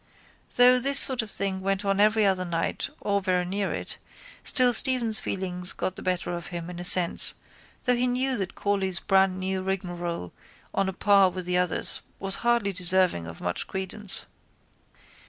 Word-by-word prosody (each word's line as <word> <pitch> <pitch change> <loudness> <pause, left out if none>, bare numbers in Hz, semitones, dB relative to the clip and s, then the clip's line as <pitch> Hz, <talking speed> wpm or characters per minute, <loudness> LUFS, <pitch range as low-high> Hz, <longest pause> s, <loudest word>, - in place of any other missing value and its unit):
Though 250 +1 +5
this 275 +2 +4
sort 260 -3 +3
of 220 - -8
thing 195 -2 -3
went 195 +1 -2
on 195 0 0
every 215 +1 +3
other 190 -2 +1
night 170 -2 -3
or 200 -1 -1
very 180 -2 -1
near 195 +2 -3
it - - -7 0.4
still 250 -3 +6
Stephen's 235 -3 +6
feelings 180 -1 -3
got 185 - -4
the - - -9
better 180 -1 -2
of 170 0 -8
him 175 0 -7
in 175 - -9
a - - -6
sense 180 -1 +4 0.5
though 250 -1 +2
he 245 +1 0
knew 255 +2 0
that 190 -3 -5
Corley's 195 -3 -2
brandnew 190 -1 0
rigmarole 175 - -5 0.4
on 195 -1 -1
a - - -6
par 200 0 +3
with 185 0 -7
the 180 0 0
others 180 -2 -1 0.2
was 195 0 -2
hardly 235 -4 0
deserving 180 - 0
of 80 0 -11
much 90 0 -4
credence. 190 +1 -6
190 Hz, 175 wpm, -25 LUFS, 180-210 Hz, 0.5 s, still